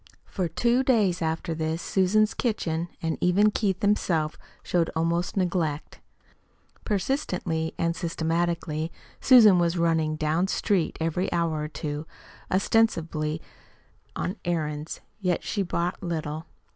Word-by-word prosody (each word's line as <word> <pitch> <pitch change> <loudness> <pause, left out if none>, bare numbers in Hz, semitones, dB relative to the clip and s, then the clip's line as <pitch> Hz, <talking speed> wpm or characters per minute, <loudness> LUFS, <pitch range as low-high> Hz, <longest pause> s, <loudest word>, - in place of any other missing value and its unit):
For 185 -3 -2
two 240 +9 +2
days 215 -10 +2
after 160 +1 -1
this 160 0 -2
Susan's 200 +4 +2
kitchen, 170 -8 -1
and 165 -1 -1
even 200 +4 +4
Keith 195 -3 -1
himself, 170 -7 +1 0.3
showed 170 -2 +1
almost 170 +3 0
neglect; 170 -5 -1 0.8
persistently 180 - -1
and 170 0 0
systematically 165 -1 -1 0.3
Susan 220 -8 +7
was 170 0 +1
running 165 -2 +1
"down 155 +4 +1
street" 190 -3 0
every 165 +3 -1
hour 165 -3 0
or 150 - -2
two 150 0 -5 0.4
ostensibly 165 -7 +1 0.7
on 185 +5 -3
errands, 155 -2 -3 0.2
yet 180 -4 0
she 205 - -1
bought 175 -1 -2
little. 160 -2 -4
170 Hz, 120 wpm, -26 LUFS, 160-190 Hz, 0.8 s, Susan